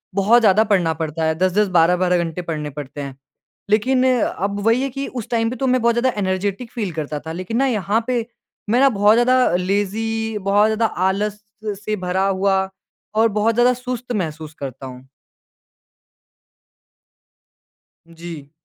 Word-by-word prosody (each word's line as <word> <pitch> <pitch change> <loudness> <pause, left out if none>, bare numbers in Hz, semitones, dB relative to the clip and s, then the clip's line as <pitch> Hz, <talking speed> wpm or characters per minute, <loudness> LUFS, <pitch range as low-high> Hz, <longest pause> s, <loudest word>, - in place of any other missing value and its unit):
बहुत 215 +5 +4
ज़्यादा 215 0 +5
पढ़ना 170 -5 +3
पड़ता 160 +1 -3
है। 160 0 +1
10-10 185 +4 +2
12-12 180 +2 +3
घंटे 165 +1 -4
पढ़ने 155 -3 -4
पड़ते 145 0 -7
हैं। 140 -2 -7 0.5
लेकिन 255 +5 +2 0.2
अब 200 +1 -2
वही 230 +3 +3
है 275 - -1
कि 275 +2 -5
उस - - -13
टाइम 225 -1 +1
पे 250 - -5
तो 265 +2 -1
मैं 255 -1 +2
बहुत 235 0 +2
ज़्यादा 250 +2 +2
एनर्जेटिक 195 +4 -2
फ़ील 210 -6 -3
करता 150 -1 -4
था, 160 +2 -8
लेकिन 185 +7 -4
ना 270 - +3
यहाँ 215 -1 0
पे 245 -3 0 0.4
मैं 240 +3 +3
ना 275 +1 +6
बहुत 205 +1 +6
ज़्यादा 250 -4 +3
लेज़ी, 210 +4 -1
बहुत 205 +2 +3
ज़्यादा 220 +1 +1 0.2
आलस 210 +2 -2 0.4
से 215 +1 -2
भरा 185 +2 0
हुआ 190 0 +1 0.5
और 225 +1 +4
बहुत 225 +2 +2
ज़्यादा 245 +1 +4
सुस्त 250 0 -6
महसूस 155 -6 -4
करता 135 -1 -7
हूँ। 130 +1 -12 3.0
जी। 165 -4 -9
200 Hz, 160 wpm, -20 LUFS, 175-230 Hz, 3.0 s, ना